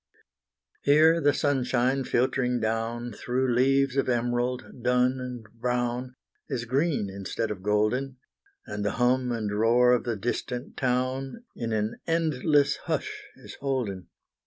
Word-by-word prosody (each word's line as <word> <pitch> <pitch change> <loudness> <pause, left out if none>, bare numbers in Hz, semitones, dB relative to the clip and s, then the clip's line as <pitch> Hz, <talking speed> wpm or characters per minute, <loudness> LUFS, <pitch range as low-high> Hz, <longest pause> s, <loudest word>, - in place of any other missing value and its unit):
Here 160 +3 +5
the 145 - +4
sunshine, 135 -2 +1
filtering 125 0 +1
down, 115 +2 -2
Through 125 +3 -1
leaves 135 +2 +3
of 135 - +1
emerald, 120 +1 -1
dun 125 +2 +2
and 125 -2 -6 0.2
brown, 125 +1 -1 0.3
Is 115 -2 -2
green 140 -2 0
instead 100 +3 -3
of 95 -3 -5
golden 110 +6 0 0.5
And 105 0 -4
the 105 - 0
hum 125 +1 +2
and 110 -3 -2
roar 120 +3 +4
of 125 - +3
the 120 -2 -2
distant 120 +3 -4
town 130 - -1
In 115 -1 -3
an 110 +1 -1
endless 155 -3 +2
hush - - -3
is - - -12
holden. 125 -10 -2
125 Hz, 135 wpm, -27 LUFS, 115-135 Hz, 0.5 s, Here